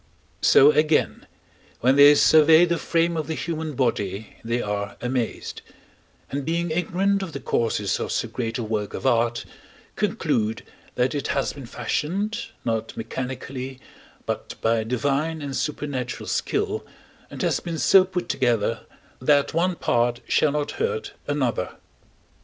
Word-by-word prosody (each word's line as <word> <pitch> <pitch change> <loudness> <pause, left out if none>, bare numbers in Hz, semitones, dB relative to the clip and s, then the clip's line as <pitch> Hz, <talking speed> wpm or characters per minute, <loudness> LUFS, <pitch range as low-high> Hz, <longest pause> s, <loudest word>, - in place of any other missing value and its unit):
So, 140 +2 +7
again, 150 +1 +1 0.5
when 130 +3 +4
they 145 +1 +8
survey 160 +3 +6
the 170 -1 -1
frame 170 0 +1
of 155 -3 -2
the 160 - -2
human 160 -2 -3
body, 110 -5 -2
they 115 +1 -1
are 100 -2 -3
amazed; 125 -2 -3 0.7
and 140 +1 -2
being 165 +2 -1
ignorant 190 +4 +1
of 185 -5 -5
the 140 - -4
causes 110 -6 0
of - - -3
so - - -1
great 115 -2 -3
a 120 - -3
work 105 -2 -3
of - - -6
art, 120 -2 +2 0.5
conclude 110 0 -1 0.3
that 125 +3 +1
it 145 -2 -2
has 140 - 0
been 140 -4 -9
fashioned, 180 - -2 0.2
not 115 -1 -2
mechanically, 130 +2 -5 0.5
but - - -4
by 115 0 +1
divine 140 +7 -1
and 140 -2 -5
supernatural 145 -4 -3
skill, 420 +1 -1 0.5
and - - -6
has - - +1
been 170 -2 -5
so 190 +3 +6
put 185 -1 -4
together 115 -4 0 0.3
that 145 +3 +3
one 175 +2 +1
part 120 -4 +1
shall 150 -2 +2
not 150 -1 -1
hurt 460 -1 -2
another. - - -1
140 Hz, 145 wpm, -24 LUFS, 120-165 Hz, 0.7 s, they